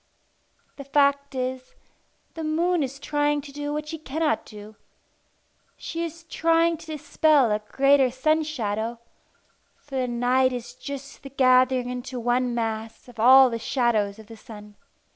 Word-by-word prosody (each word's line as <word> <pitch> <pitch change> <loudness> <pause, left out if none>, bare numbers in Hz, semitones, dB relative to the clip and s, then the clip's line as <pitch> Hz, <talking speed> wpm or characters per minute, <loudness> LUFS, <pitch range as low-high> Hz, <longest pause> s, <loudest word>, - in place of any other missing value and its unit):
The 280 - -7
fact 280 0 +1
is, 255 0 -4 0.6
the 325 - -6
moon 335 +3 +1
is 275 -1 -3
trying 290 +1 0
to 280 0 -12
do 290 +1 -5
what 300 +1 -4
she 320 0 -6
cannot 310 +1 -2
do. 210 0 -12 1.0
She 330 +1 -5
is 335 0 -7
trying 330 0 +1
to 325 - -14
dispel 300 -4 +2
a 210 - +1
great 275 +6 +2
sun 310 +5 +1
shadow 230 -6 -3 0.8
for 275 -2 -8
the 255 -1 0
night 250 +2 +1
is 240 -1 -6
just 275 +1 -9
the 275 - -10
gathering 255 -1 +3
into 250 0 -5
one 245 +1 0
mass 225 0 -4
of 245 -2 -14
all 260 +2 +7
the 230 - -3
shadows 225 -5 0
of 220 - -13
the 225 +1 -12
sun. 210 -2 -13
260 Hz, 155 wpm, -24 LUFS, 240-295 Hz, 1.0 s, all